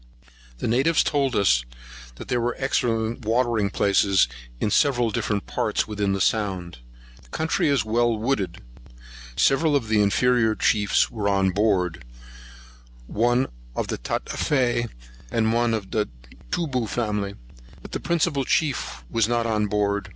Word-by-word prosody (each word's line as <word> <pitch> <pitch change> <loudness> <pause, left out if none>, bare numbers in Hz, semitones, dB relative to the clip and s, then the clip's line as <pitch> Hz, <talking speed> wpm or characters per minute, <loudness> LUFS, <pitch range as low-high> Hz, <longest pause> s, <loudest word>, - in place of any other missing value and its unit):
The - - -3
natives 135 +8 +3
told 135 -4 0
us - - +3 0.5
there 120 -1 -2
were 120 +1 -1
excellent 120 -3 -1
watering 115 -2 +1
places 100 -3 +3 0.3
in 105 - 0
several 120 -4 +2
different 105 -1 -2
parts - - -1
within 105 -2 -1
the 95 - -1
sound. 95 - -1 0.4
The - - -22
country 160 - 0
is 135 -7 +2
well 115 +1 +1
wooded. 105 - -2 0.7
Several 145 - +3
of 120 -6 0
the 110 -1 +3
inferior 115 +2 +2
chiefs 105 -3 +2
were 105 -3 -1
on 95 -1 +2
board, 95 - 0 1.0
one 120 - +1 0.3
of - - -2
the - - -3
Tatafee, 120 - -1 0.4
and 110 - +1
one 120 -1 +2
of 100 -3 -6
the 105 -2 0 0.4
Toobou 135 - -1
family; 105 -2 -2 0.5
but - - -11
the - - -3
principal 170 -4 0
chief 135 - -1
was 115 - +1
not 120 0 0
on 105 -2 0
board. 100 -1 -1
110 Hz, 140 wpm, -24 LUFS, 100-125 Hz, 1.0 s, natives